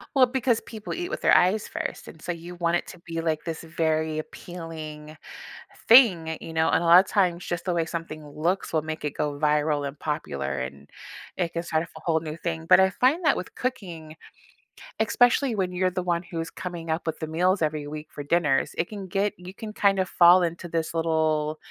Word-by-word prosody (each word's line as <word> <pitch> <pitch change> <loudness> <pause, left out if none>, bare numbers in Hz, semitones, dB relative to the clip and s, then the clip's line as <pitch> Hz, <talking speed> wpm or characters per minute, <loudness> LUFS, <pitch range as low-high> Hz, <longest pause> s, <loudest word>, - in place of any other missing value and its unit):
Well, 255 -2 +6
because 245 -2 +1
people 215 -2 -7
eat 355 +1 -4
with - - -4
their - - +5
eyes 200 +4 +3
first, - - -5
and 160 - -12
so 175 - -3
you 170 +1 -8
want 170 0 +1
it - - -1
to 180 - -11
be, 165 -1 -6
like, 160 -2 -1
this 165 0 -5
very 160 -1 -1
appealing 155 -3 -8 0.7
thing, 185 -10 +6
you 165 - -8
know, 160 0 +2
and - - +3
a - - -1
lotta 175 +3 +8
times, 180 -3 0
just 175 +1 -4
the 180 - 0
way 165 -1 +1
something 155 -3 -6
looks 165 +6 -2
will 155 - +2
make 155 0 -5
it 145 - -1
go 145 -1 -2
viral 150 -1 +1
and 140 +1 -9
popular, 70 - -3
and 70 +2 -7 0.5
it 175 -2 -1
can 170 - -1
start 160 -1 -1
off - - -12
a - - -9
whole 160 -2 +1
new 155 0 -6
thing, 165 -2 -4
but - - +7
I 190 0 +5
find 265 - +2
that 305 - +3
with - - -6
cooking, 170 -11 -5 0.9
especially 245 +2 +3
when 185 -2 -1
you're 185 +1 +1
the 185 0 -3
one 175 -1 0
who's 165 -2 -5
coming 170 -3 -6
up 160 +1 -2
with 160 - -2
the 160 - -4
meals 180 +3 +1
every 150 -1 -1
week 155 +1 -7
for 145 - -7
dinners, 150 -3 +1
it 170 - -1
can 200 -3 -6
get 200 +2 0
you 180 +2 -10
can 215 0 -7
kind 200 -2 +2
of 185 - +1
fall 175 +1 +7
into 170 0 -3
this 165 -1 -2
little 160 -2 0
165 Hz, 220 wpm, -25 LUFS, 155-185 Hz, 0.9 s, lotta